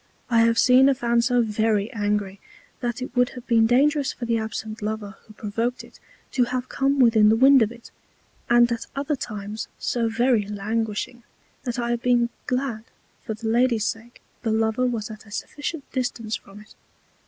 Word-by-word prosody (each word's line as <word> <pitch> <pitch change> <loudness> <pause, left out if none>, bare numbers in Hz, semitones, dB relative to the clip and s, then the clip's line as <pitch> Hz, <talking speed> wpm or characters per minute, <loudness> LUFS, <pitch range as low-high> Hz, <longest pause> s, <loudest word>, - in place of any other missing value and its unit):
I 230 - +4
have 230 0 +2
seen 255 +3 +6
a 275 - +3
Fan 235 -1 +1
so 245 0 +2
very 215 -1 0
Angry, 205 -2 -1 0.4
that 240 0 -3
it 255 - -8
would 245 0 +3
have 245 - -9
been 225 -3 +4
dangerous 280 +3 +3
for 240 - -6
the 230 -1 +1
absent 220 0 -5
Lover 210 -2 -4
who 215 - -14
provoked 230 +4 -3
it - - -17 0.3
to 250 -2 +2
have 255 +1 -3
come 275 +1 +1
within 225 -4 +6
the 220 - +5
Wind 265 +2 +6
of 220 0 +2
it; 240 -1 -13 0.6
and 240 0 +5
at 235 - -3
other 285 +2 -1
times 210 -3 -6
so 230 -2 -1
very 235 -1 +2
languishing, 215 +3 -3 0.4
that 245 -1 -3
I 240 -1 -1
have 240 -1 -1
been 240 -1 +2 0.2
glad 250 -4 -2 0.4
for 220 -2 -4
the 225 +1 -6
Lady's 235 -1 +2
sake 225 +2 -5 0.2
the 225 - -2
Lover 220 +3 +1
was 225 -3 -3
at 215 0 -11
a - - -14
sufficient 290 +7 -5
Distance 240 -4 -2
from 200 +1 -12
it. 215 - -17
235 Hz, 190 wpm, -24 LUFS, 220-250 Hz, 0.6 s, seen